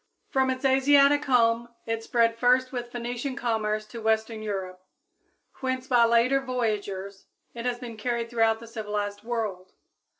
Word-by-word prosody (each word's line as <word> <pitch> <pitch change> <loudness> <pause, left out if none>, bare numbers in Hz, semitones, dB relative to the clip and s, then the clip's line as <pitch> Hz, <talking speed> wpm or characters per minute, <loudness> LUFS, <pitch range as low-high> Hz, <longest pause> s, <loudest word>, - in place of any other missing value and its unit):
From 265 0 +2
its 260 +1 -2
Asiatic 280 +2 +5
home 235 -2 +3 0.2
it 225 0 -2
spread 230 0 +2
first 255 +2 +3
with 240 -2 -5
Phoenician 245 +2 -4
commerce 215 -3 -1
to 230 +2 -9
western 220 0 0
Europe, 190 -3 -5 0.8
whence 260 -1 -2
by 245 -3 +4
later 235 +4 +3
voyageurs 205 -6 -3 0.3
it 235 +1 -4
has 245 -1 -1
been 240 -2 -8
carried 235 +1 -2
throughout 225 -1 +2
the 230 - -10
civilized 210 -2 -4
world. 215 -6 -4
235 Hz, 145 wpm, -26 LUFS, 220-250 Hz, 0.8 s, Asiatic